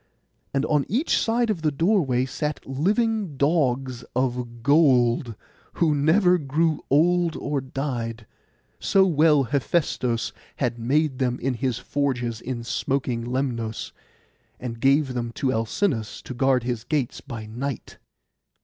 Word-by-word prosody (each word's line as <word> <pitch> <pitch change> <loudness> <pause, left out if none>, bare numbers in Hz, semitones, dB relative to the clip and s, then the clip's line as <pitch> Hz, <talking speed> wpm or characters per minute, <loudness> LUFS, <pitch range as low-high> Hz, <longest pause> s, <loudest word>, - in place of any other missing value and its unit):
And 135 0 0
on 150 -2 +2
each 260 - +1
side 230 0 +1
of 180 -6 -3
the 155 - +2
doorway 145 - +2
sat 150 +3 -4
living 200 - 0
dogs 135 -5 +1
of 125 -2 -2
gold, 125 -5 +3 0.4
who 160 -3 +2
never 180 +5 +4
grew 155 +2 0
old 170 +3 +3
or 145 -2 -2
died, 120 -4 -4 0.5
so 195 -1 +4
well 155 -4 +4
Hephaistos 130 -3 0 0.2
had 120 - -2
made 135 +3 +1
them 125 -2 0
in 135 +1 -1
his 125 -1 -1
forges 125 -4 -2
in 120 -2 -4
smoking 125 0 -1
Lemnos, 120 -3 -3 0.7
and 120 -2 -6
gave 135 0 +3
them 120 -1 -3
to 130 +1 0
Alcinous 115 - -1
to - - -7
guard 130 0 +2
his 120 -2 -3
gates 140 -5 -2
by 115 -5 -7
night. 120 +4 -5
135 Hz, 130 wpm, -24 LUFS, 120-155 Hz, 0.7 s, never